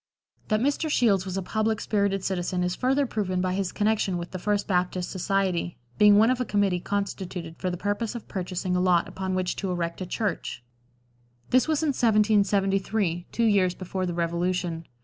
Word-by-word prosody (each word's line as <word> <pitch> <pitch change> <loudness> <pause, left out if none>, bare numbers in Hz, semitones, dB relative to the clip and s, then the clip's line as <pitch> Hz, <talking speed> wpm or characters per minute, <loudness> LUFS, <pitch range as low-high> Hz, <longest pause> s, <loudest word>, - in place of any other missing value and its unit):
That 215 0 +1
Mr. 285 +4 0
Shields 205 -9 +3
was 185 0 -3
a 195 - -2
public 220 +3 0
spirited 200 -3 0
citizen 180 -1 -1
is 180 0 0
further 270 +2 +1
proven 195 -6 -2
by 185 0 0
his 190 -1 -1
connection 210 -3 +1
with 170 0 -6
the 185 - -5
First 205 +2 0
Baptist 180 -1 0
Society, 185 - -1 0.2
being 210 -1 +7
one 225 +4 +5
of 255 0 0
a - - +2
committee 200 -5 +1
constituted 185 -4 -4
for 185 - -1
the 180 - -3
purpose 205 +5 -2
of 235 - -7
purchasing 180 -1 -3
a 180 - +2
lot 180 -2 +3
upon 190 -1 -3
which 185 -1 -1
to 195 - -3
erect 170 0 -3
a 185 - -4
church; 205 - -3 0.9
this 255 +3 +4
was 315 0 +1
in 310 - +2
1773, 200 -5 +2
two 235 - 0
years 195 -5 +3
before 185 0 -3
the 175 - -3
Revolution. 170 0 -1
195 Hz, 190 wpm, -26 LUFS, 180-210 Hz, 0.9 s, being